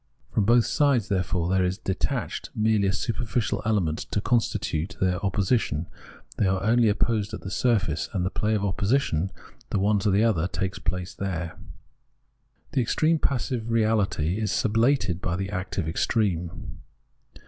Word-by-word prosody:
From 105 - +1
both 120 +1 +5
sides, 135 -7 +2
therefore, 90 -3 0
there 95 +1 +2
is 90 +1 0
detached 95 -4 -3
merely 110 -2 +2
a - - +2
superficial 115 +2 -1
element 90 -8 +1
to - - 0
constitute 100 -6 -1
their 90 -1 +1
opposi 100 +4 +2
tion; 75 -4 -3 0.5
they 100 - +2
are 95 0 0
only 115 +1 +4
opposed 105 0 0
at - - -9
the 95 - -6
surface, 95 - +1
and 90 -2 -1
the 95 - -1
play 110 +1 0
of 100 -1 0
opposition, 100 - +1 0.4
the - - 0
one 100 +2 +2
to 100 - +1
the 100 +3 +3
other, 95 -7 +2
takes 95 0 -3
place 90 0 -3
there. 85 -4 -4 1.2
The 130 - +1
extreme 155 +7 +2
of - - -12
passive 125 -3 -1
reahty 110 -6 +1
is 110 -2 -1
sublated 115 -5 +1
by 85 - -1
the 95 +1 -3
active 95 -3 -3
extreme. 90 -1 -1
100 Hz, 160 wpm, -26 LUFS, 90-110 Hz, 1.2 s, both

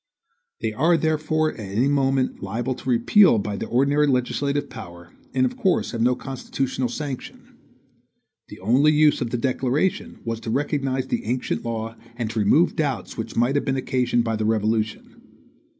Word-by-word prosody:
They 110 -1 -1
are 165 +9 +3
therefore 155 0 0
at - - -13
any 105 +5 0
moment 135 -2 +1
liable 115 +7 -2
to 130 - -7
repeal 120 - +5
by 105 0 -2
the - - -4
ordinary 140 +4 +2
legislative 140 +2 0
power, 85 -6 -11 0.2
and 260 - +2
of 250 0 -2
course 200 -8 +1
have 115 - -3
no 125 +2 +3
constitutional 130 -1 -3
sanction. 140 0 -7 0.9
The - - -11
only 130 +9 +4
use 150 -1 +4
of 120 - -1
the 125 - -1
declaration 130 +7 -1
was 115 -1 -2
to 115 - -6
recognize 135 0 -1
the - - -2
ancient 125 +3 -2
law 115 -1 -4 0.2
and 115 -2 -3
to 110 - -2
remove 145 - +3
doubts 150 -4 -2
which 110 - -5
might 120 +3 +2
have 145 - 0
been 135 0 0
occasioned 125 -2 +1
by 115 -1 -1
the 110 - -1
Revolution. 110 0 -1
130 Hz, 170 wpm, -23 LUFS, 115-145 Hz, 0.9 s, repeal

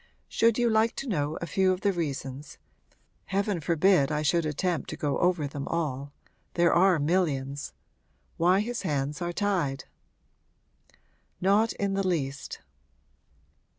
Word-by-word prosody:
Should 230 -1 +2
you 240 -1 +2
like 225 +1 +2
to 275 - -5
know 150 - -1
a - - -1
few 185 +4 +2
of 185 0 -2
the 200 -1 +2
reasons 140 -4 -5 0.7
heaven 195 -1 -1
forbid 165 -1 +3
I 150 0 0
should 165 +1 +2
attempt 165 +1 -2
to - - -6
go 145 -2 -1
over 175 -4 +2
them 140 0 -5
all; 145 -4 -2 0.4
there 170 0 +4
are 185 0 +5
millions! 145 -4 -1 0.6
why 180 +4 +3
his 240 +2 -3
hands 150 -2 -2
are 175 0 -1
tied?' 175 -8 -1 1.5
'Not 205 +4 +3
in 200 -1 -2
the 195 -1 0
least.' 140 -6 -3
170 Hz, 140 wpm, -27 LUFS, 145-195 Hz, 1.5 s, are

